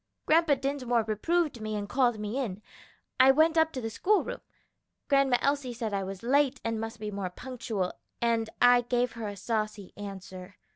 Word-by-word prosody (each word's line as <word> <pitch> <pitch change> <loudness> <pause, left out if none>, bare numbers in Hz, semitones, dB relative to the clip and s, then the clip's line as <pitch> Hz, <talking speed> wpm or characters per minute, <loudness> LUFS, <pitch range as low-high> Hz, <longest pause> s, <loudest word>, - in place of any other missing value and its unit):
Grandpa 320 -2 +4
Dinsmore 260 -4 0
reproved 255 - 0
me 215 0 -3
and 205 -1 -3
called 245 0 +2
me 210 +5 -3
in. 215 -6 -4 0.6
I 260 +1 +8
went 315 +4 +5
up 320 0 +4
to 255 - -4
the 225 -1 -4
school 410 - +2
room. - - -6 0.7
Grandma 275 -3 +4
Elsie 280 -3 0
said 225 -3 -3
I 195 -1 0
was 195 +2 -7
late 275 +2 +2
and 225 -1 -1
must 225 0 -6
be 210 0 -4
more 195 -2 -3
punctual, 225 -3 -4 0.3
and 230 -1 +1
I 245 0 +6
gave 245 0 0
her 230 -2 -6
a 205 -1 -6
saucy 215 -2 -3
answer. 195 -1 -9
235 Hz, 185 wpm, -29 LUFS, 210-270 Hz, 0.7 s, I